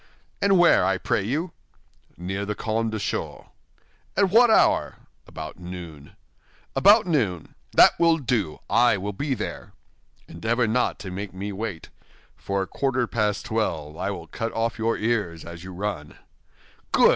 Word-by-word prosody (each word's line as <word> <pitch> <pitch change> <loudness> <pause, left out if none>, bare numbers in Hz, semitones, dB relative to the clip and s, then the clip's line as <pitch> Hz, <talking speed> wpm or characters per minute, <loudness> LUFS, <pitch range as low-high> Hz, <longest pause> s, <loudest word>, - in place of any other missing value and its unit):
"And 200 -1 +4
where, 175 - +5
I 95 +1 +2
pray 100 - 0
you?" 150 - -2 0.7
"Near 95 +3 -4
the 105 +1 -3
Carmes 110 +1 -1
Deschaux." 110 -2 -4 0.7
"At 195 -2 +3
what 240 +3 +6
hour?" 220 - +3 0.3
"About - - -8
noon." 85 -5 -9 0.6
"About 210 +2 +6
noon? 110 - -1 0.2
That - - +6
will 165 -1 +4
do; 115 - -2
I 120 -2 +4
will 100 +2 -4
be 135 +7 -2
there." - - -6 0.5
"Endeavor 115 +8 0
not 115 +3 0
to 95 - -5
make 95 0 -6
me 100 +2 -4
wait; 100 -4 -5 0.5
for 100 0 -2
at 95 - -10
quarter 130 -3 0
past 105 -3 -1
twelve 80 -9 -2
I - - -2
will - - -5
cut 115 0 -4
off 115 +1 -1
your 115 +1 +1
ears 105 -8 -1
as 85 0 -9
you 95 - -8
run." 90 -6 -5 0.7
"Good!" - - +6
105 Hz, 155 wpm, -24 LUFS, 95-125 Hz, 0.7 s, what